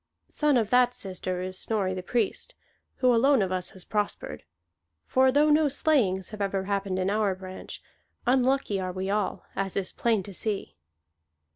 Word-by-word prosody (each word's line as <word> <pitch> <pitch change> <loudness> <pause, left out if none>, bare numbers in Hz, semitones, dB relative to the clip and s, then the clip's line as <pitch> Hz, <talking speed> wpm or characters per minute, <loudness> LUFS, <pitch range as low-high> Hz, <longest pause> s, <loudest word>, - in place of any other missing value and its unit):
Son 295 -3 +2
of 220 -3 0
that 250 0 +4
sister 185 -4 -3
is 185 0 -3
Snorri 200 -4 -1
the 185 - -4
Priest, 235 - -1 0.4
who 250 -1 +3
alone 260 0 +4
of 185 - -3
us 185 -1 0
has 185 -2 -7
prospered; 210 -1 -3 0.6
for 260 0 +3
though 295 +3 +4
no 300 0 +4
slayings 225 - +2
have 215 -1 -7
ever 195 -1 -1
happened 195 -1 -2
in 185 +1 0
our 205 -2 +1
branch, 185 0 -9 0.4
unlucky 255 -4 +2
are 185 -1 -3
we 190 +1 -3
all, 210 -1 -1
as 195 0 -2
is 195 -2 -1
plain 225 -4 0
to 200 - -9
see." 195 - -1
205 Hz, 170 wpm, -27 LUFS, 185-250 Hz, 0.6 s, that